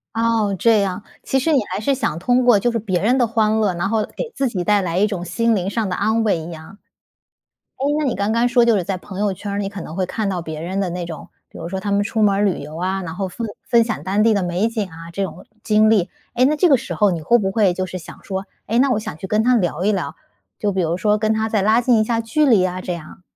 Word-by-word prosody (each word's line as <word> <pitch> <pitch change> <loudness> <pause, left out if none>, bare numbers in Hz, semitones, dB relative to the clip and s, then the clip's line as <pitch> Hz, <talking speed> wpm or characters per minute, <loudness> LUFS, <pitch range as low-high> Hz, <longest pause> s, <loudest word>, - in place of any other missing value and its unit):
哦， 225 -3 +1
这 220 +1 +4
样。 195 +1 -2 0.2
其 265 - 0
实 315 +4 +1
你 275 - +5
还 - - -2
是 275 +6 +1
想 165 - -2
通 245 +8 +2
过 240 -5 +5
就 240 +4 +1
是 230 - -1
别 190 -4 -1
人 245 +6 +3
的 240 -2 +3
欢 220 -1 +1
乐， 205 -4 +1
然后 200 +5 0
给 470 - -6
自 275 -1 0
己 185 -5 -3
带 205 +1 +3
来 170 -1 -2
一 205 - +4
种 195 -5 -3
心 230 +6 +1
灵 185 0 -1
上 215 0 -1
的 180 - -2
安 220 +3 +1
慰 200 -6 +2
一 160 +2 -7
样。 165 +5 -11 1.0
诶， 270 - -1
那 305 - 0
你 255 - 0
刚 200 +2 -1
刚 235 +2 +2
说 240 -1 +4
就 230 -3 +4
是 180 - -1
在 190 0 -2
朋 190 +1 -9
友 205 -1 +1
圈 205 +2 -7
儿， 200 - -2
你 195 -1 -2
可 200 -1 -8
能 160 +1 -8
会 185 -1 0
看 210 +1 -2
到 180 -2 -2
别 160 -2 -6
人 185 +4 -3
的 195 - 0
那 175 0 -4
种， 165 -2 -8 0.2
比 - - -13
如 165 - -6
说 190 +1 -4
他 205 - -3
们 200 0 +2
出 220 0 -1
门 200 -2 +4
儿 205 - +2
旅 195 -5 0
游 150 +2 -8
啊， 190 +2 -2
然 165 -2 -6
后 195 0 -2
分 225 +5 -5 0.2
分 235 -2 +5
享 190 -11 -3
当 200 +3 +1
地 225 +1 +4
的 200 -3 +1
美 180 +5 0
景 220 -4 -3
啊， 165 0 -11
这 195 +2 -1
种 - - -8 0.2
经 215 0 +4
历。 200 -4 +3 0.3
诶， 250 - +3
那 295 +4 +3
这 340 +4 +3
个 275 - +6
时 - - -6
候 210 -2 +3
你 170 -3 -2
会 235 +10 +3
不 195 -4 -1
会 195 -3 +2
就 185 - -2
是 185 0 -6
想 165 - -12
说， 190 0 -4 0.2
诶， 230 +3 0
那 270 +1 +4
我 215 - +1
想 210 - -6
去 190 - -6
跟 215 +3 +1
他 250 +1 +4
聊 175 -3 -1
一 210 - +3
聊， 175 -6 -2 0.4
就 205 - 0
比 190 - -1
如 170 +1 0
说 210 +2 +1
跟 215 0 +1
他 220 0 0
再 210 -3 +1
拉 220 +4 +4
近 240 -2 +3
一 215 - +3
下 230 0 0
距 285 +7 +1
离 225 -7 +5
呀， 185 0 -1
这 180 - -4
样？ 170 +2 -9
205 Hz, 320 characters per minute, -20 LUFS, 185-225 Hz, 1.0 s, 个